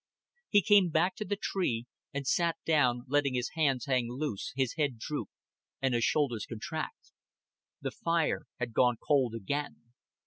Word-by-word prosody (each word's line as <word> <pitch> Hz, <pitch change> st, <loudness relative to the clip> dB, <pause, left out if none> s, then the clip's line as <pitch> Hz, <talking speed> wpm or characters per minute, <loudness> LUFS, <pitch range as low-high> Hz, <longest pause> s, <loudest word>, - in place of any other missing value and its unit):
He 205 Hz, -2 st, +5 dB
came 205 Hz, -4 st, +6 dB
back 170 Hz, +6 st, +2 dB
to 215 Hz, -, -3 dB
the 205 Hz, -, -1 dB
tree; 155 Hz, -, -1 dB, 0.3 s
and 140 Hz, -2 st, -4 dB
sat 170 Hz, +4 st, +2 dB
down, 125 Hz, -6 st, +3 dB
letting 140 Hz, -1 st, +2 dB
his 125 Hz, 0 st, -1 dB
hands 145 Hz, -6 st, +1 dB
hang 125 Hz, -4 st, +1 dB
loose, 130 Hz, -5 st, -3 dB
his 130 Hz, -3 st, 0 dB
head 145 Hz, -6 st, 0 dB
droop, 145 Hz, +6 st, -4 dB, 0.5 s
and 135 Hz, -2 st, +1 dB
his 120 Hz, -1 st, +2 dB
shoulders 130 Hz, -7 st, +1 dB
contract. 155 Hz, -, -5 dB, 0.7 s
The -, -, -2 dB
fire 165 Hz, -1 st, 0 dB
had 120 Hz, -2 st, -3 dB
gone 125 Hz, +1 st, +4 dB
cold 130 Hz, -6 st, +2 dB
again. 120 Hz, +1 st, -4 dB
140 Hz, 160 wpm, -31 LUFS, 120-160 Hz, 0.7 s, came